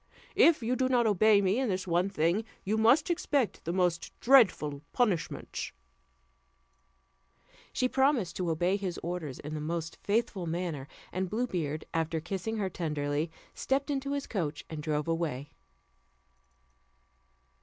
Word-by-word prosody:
If 320 -7 +5
you 245 +3 +1
do 260 0 +1
not 245 -2 +3
obey 210 0 +5
me 195 +4 +2
in 265 -3 0
this 185 -1 -1
one 175 +2 +1
thing, 175 +3 +1 0.2
you 210 +3 0
must 240 - +4
expect 290 - 0
the 170 - -1
most 175 -2 -1
dreadful 190 - +4
punishments." 210 -10 -1 2.0
She 255 - +1
promised 265 - +2
to 180 -2 -1
obey 175 +4 +1
his 190 -4 -4
orders 165 -6 -4
in 150 +1 -7
the 155 - -3
most 165 +1 -4
faithful 205 -4 0
manner; 165 -5 -3 0.2
and 185 0 -2
Blue 230 +5 0
Beard, 155 -8 -3
after 165 0 0
kissing 195 +6 -3
her 200 -3 0
tenderly, 150 -3 -2 0.2
stepped 275 +2 -1
into 275 0 -2
his 280 -1 -2
coach, 160 -8 -3
and 155 -1 -4
drove 150 0 -1
away. 155 -4 -2
185 Hz, 145 wpm, -30 LUFS, 160-230 Hz, 2.0 s, If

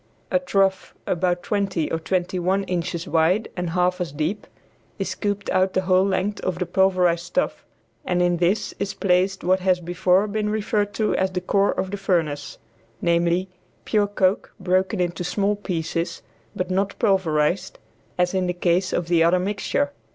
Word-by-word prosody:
A 275 - +3
trough, 195 -7 0
about 175 0 0
twenty 195 -6 -1
or 165 - 0
twenty 180 +2 -1
one 190 +3 +1
inches 170 -2 -3
wide 170 +7 +2
and 180 -2 -2
half 180 +1 +1
as 175 - -2
deep, 155 +8 -3 0.5
is - - -2
scooped 205 -1 -3
out 185 0 +2
the 185 - +2
whole 185 0 +4
length 195 +2 -1
of 185 -2 -2
the 180 - -1
pulverized 180 -2 +2
stuff, 175 +11 -2 0.4
and 180 -1 0
in 175 -1 +2
this 180 +5 +1
is 195 -1 -3
placed 190 0 +1
what 185 +1 +3
has 185 -1 +2
before 180 +3 +2
been 210 0 -2
referred 210 -1 -1
to 215 -2 +1
as 190 - +1
the 185 -1 -2
core 195 +2 +2
of 190 - -3
the 205 - -3
furnace, 155 -7 -1 0.4
namely, 170 +2 +1 0.4
pure 210 -2 +2
coke 195 -1 0
broken 185 +2 +1
into 175 -1 -1
small 200 +3 0
pieces, 170 -3 -3 0.3
but 180 0 -3
not 195 +2 0
pulverized, 185 -3 +1 0.4
as 180 0 +1
in 185 -1 0
the 180 - 0
case 180 +1 +1
of 175 - -1
the 170 -1 +4
other 170 +2 +4
mixture. 205 +9 -1
185 Hz, 175 wpm, -23 LUFS, 175-195 Hz, 0.5 s, whole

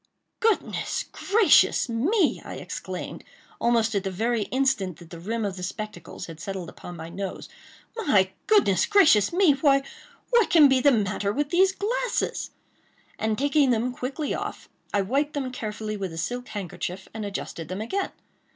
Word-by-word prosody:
"Goodness 450 -2 0
gracious 410 -6 +4
me!" 300 - +1
I - - -7
exclaimed, - - -6 0.4
almost 230 -2 +2
at 200 -2 0
the 195 - -2
very 225 +3 0
instant 260 - 0
that 170 -2 -15
the 170 - -8
rim 220 +5 -2
of 195 -2 -3
the - - -7
spectacles 210 0 -6
had 165 -2 -10
settled 190 -3 -5
upon 175 - -10
my 160 0 -7
nose—"My! 195 - -2 0.2
goodness 400 - +4
gracious 320 - +5
me!—why, 290 -6 +4 0.5
what 475 -3 +4
can 310 -4 +7
be 265 -1 +3
the 285 - +6
matter 205 -3 0
with 285 +5 -2
these 375 +2 +5
glasses?" 465 +6 -2 0.7
and 220 -1 0
taking 285 0 +3
them 245 +1 +1
quickly 275 +4 -3
off, - - -5 0.2
I 205 - +2
wiped 280 +8 0
them 265 -3 -3
carefully 215 -2 -4
with 190 -3 -4
a 165 - -8
silk 245 +9 -3
handkerchief, 190 -1 -5
and 220 -1 -5
adjusted 195 -5 -5
them 185 +4 -4
again. 385 - -2
230 Hz, 160 wpm, -25 LUFS, 195-290 Hz, 0.7 s, can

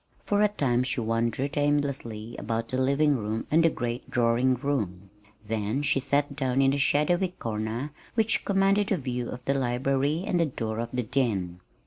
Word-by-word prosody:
For 205 0 +2
a 210 - +6
time 135 -12 0
she 130 0 -1
wandered 115 +4 -1
aimlessly 135 -6 -1
about 115 +1 -3
the 130 - -1
living 140 +2 +3
room 110 0 -3
and 165 +2 +5
the 165 - +5
great 120 -4 -4
drawing 120 +2 +2
room; 105 -9 -3 0.4
then 110 +5 -1
she 145 -1 +2
sat 140 +1 0
down 130 -2 0
in 135 0 +4
a 140 - 0
shadowy 175 +6 +2
corner 115 +5 -3 0.2
which 225 -1 +2
commanded 195 +1 +2
a 195 - +3
view 125 -4 -3
of 125 0 -8
the 140 - +2
library 135 +4 0
and 175 -4 +1
of 165 - +1
the - - -19
door 110 -1 -3
of 115 0 -3
the 125 -1 -1
den. 105 -9 -1
130 Hz, 185 wpm, -27 LUFS, 115-145 Hz, 0.4 s, a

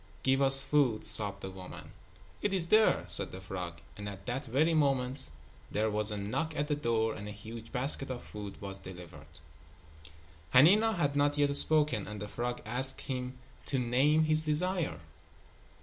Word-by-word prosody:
"Give 135 +1 +1
us 135 0 +9
food," 135 -6 +1
sobbed 105 -2 +2
the 95 - -7
woman. 95 -1 -11 0.5
"It 205 - -1
is 185 -3 0
there," 215 - +3
said 80 -1 +1
the 95 - -9
frog, 90 -3 -7 0.2
and 105 0 -7
at 100 -1 -11
that 125 +2 -3
very 150 +8 +1
moment 135 - +1 0.4
there 110 +1 -1
was 105 0 +1
a 105 - 0
knock 155 +11 -3
at 145 - -2
the 150 - -1
door 115 -5 -1
and 105 0 -9
a - - -6
huge 110 +2 -10
basket 135 +2 -1
of 125 -1 -6
food 105 -2 -9
was 100 -1 -4
delivered. 90 -3 -11 1.3
Hanina 205 - +5
had 145 -5 -1
not 145 0 +1
yet 145 -1 +1
spoken, 150 -8 +3
and 105 0 -8
the 105 - -6
frog 120 +3 -5
asked 130 +4 -1
him 125 -1 -5 0.3
to 140 - -1
name 130 +6 +2
his 155 0 +4
desire. 170 +3 -1
125 Hz, 175 wpm, -30 LUFS, 105-145 Hz, 1.3 s, us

